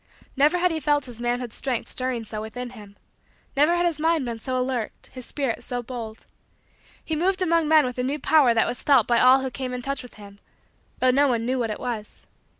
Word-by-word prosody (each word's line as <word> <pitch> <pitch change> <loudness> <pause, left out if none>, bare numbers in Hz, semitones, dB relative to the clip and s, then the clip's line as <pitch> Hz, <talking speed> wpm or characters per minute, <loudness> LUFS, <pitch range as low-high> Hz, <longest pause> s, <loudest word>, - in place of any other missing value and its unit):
Never 295 +5 +4
had 360 0 +2
he 320 - -2
felt 290 -2 +1
his 240 -2 -9
manhood's 240 -1 -2
strength 255 -4 -2
stirring 255 -2 -2
so 215 -1 -6
within 245 +3 -6
him. 205 -4 -13 0.6
Never 300 +5 +4
had 350 0 +1
his 330 -3 0
mind 320 -3 +1
been 235 -2 -4
so 255 +3 -2
alert, 250 -3 -4
his 255 -2 -9
spirit 270 -6 -3
so 245 -1 -3
bold. 225 -2 -7 0.8
He 320 - -2
moved 370 +5 +1
among 335 -2 +2
men 310 -2 +5
with 250 0 -4
a - - +1
new 275 +4 -1
power 285 -4 +4
that 225 - +4
was 245 - -3
felt 270 -6 +4
by 235 -1 +2
all 255 +1 +6
who 265 -1 -3
came 255 -1 -4
in 250 - -6
touch 275 +1 -3
with 250 - -13
him; 200 -1 -13 0.6
though 255 - +3
no 285 +3 +4
one 235 -3 0
knew 255 +1 0
what 230 -2 -1
it 215 - -4
was. 225 -4 -6
255 Hz, 230 wpm, -24 LUFS, 235-290 Hz, 0.8 s, all